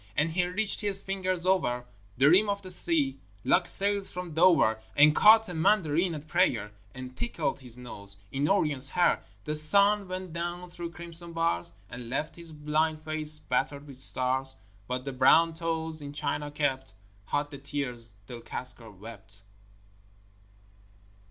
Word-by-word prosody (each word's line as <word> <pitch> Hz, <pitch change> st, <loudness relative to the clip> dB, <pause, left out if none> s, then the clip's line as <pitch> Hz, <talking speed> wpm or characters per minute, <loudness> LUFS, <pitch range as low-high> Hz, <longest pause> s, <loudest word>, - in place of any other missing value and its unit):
And 160 Hz, +2 st, +1 dB
he 180 Hz, +2 st, 0 dB
reached 200 Hz, +5 st, +1 dB
his 200 Hz, -2 st, +4 dB
fingers 185 Hz, -2 st, -3 dB
over 145 Hz, -10 st, +1 dB, 0.3 s
The 135 Hz, +3 st, +4 dB
rim 195 Hz, +7 st, +5 dB
of 200 Hz, 0 st, -2 dB
the 185 Hz, -, -1 dB
sea, 285 Hz, -, +2 dB, 0.2 s
like -, -, +2 dB
sails 200 Hz, 0 st, +3 dB
from 180 Hz, -2 st, -6 dB
Dover, 160 Hz, -10 st, +4 dB
And 150 Hz, +1 st, +6 dB
caught 220 Hz, +1 st, +6 dB
a 180 Hz, -, -7 dB
Mandarin 170 Hz, -1 st, +1 dB
at 150 Hz, +1 st, -9 dB
prayer, 130 Hz, -, +1 dB, 0.2 s
And 130 Hz, 0 st, -9 dB
tickled 170 Hz, -, -3 dB
his 125 Hz, -3 st, -6 dB
nose 100 Hz, -5 st, -4 dB
in 140 Hz, +3 st, -1 dB
Orion's 145 Hz, -8 st, +3 dB
hair. 175 Hz, -, +2 dB, 0.2 s
The 150 Hz, -, -2 dB
sun 200 Hz, +7 st, +3 dB
went 185 Hz, -2 st, -6 dB
down 175 Hz, +1 st, -5 dB
through 170 Hz, -1 st, -7 dB
crimson 170 Hz, 0 st, -6 dB
bars, 165 Hz, -, -1 dB, 0.2 s
And 120 Hz, +1 st, -9 dB
left 145 Hz, +4 st, -3 dB
his 170 Hz, -1 st, -8 dB
blind 155 Hz, +1 st, -1 dB
face 155 Hz, -1 st, -3 dB
battered 140 Hz, +1 st, -2 dB
with 135 Hz, -3 st, -13 dB
stars 130 Hz, 0 st, +1 dB, 0.3 s
But 125 Hz, +1 st, -4 dB
the 135 Hz, -, -4 dB
brown 160 Hz, +6 st, +4 dB
toes 160 Hz, -1 st, -3 dB
in 145 Hz, 0 st, -8 dB
China 145 Hz, 0 st, -2 dB
kept 135 Hz, -6 st, -2 dB, 0.3 s
Hot 145 Hz, +5 st, -2 dB
the 140 Hz, -, -9 dB
tears 125 Hz, -6 st, -4 dB
Del 120 Hz, +2 st, -9 dB
Cascar 120 Hz, -2 st, -2 dB
wept. 105 Hz, 0 st, -12 dB
155 Hz, 160 wpm, -28 LUFS, 130-180 Hz, 0.3 s, And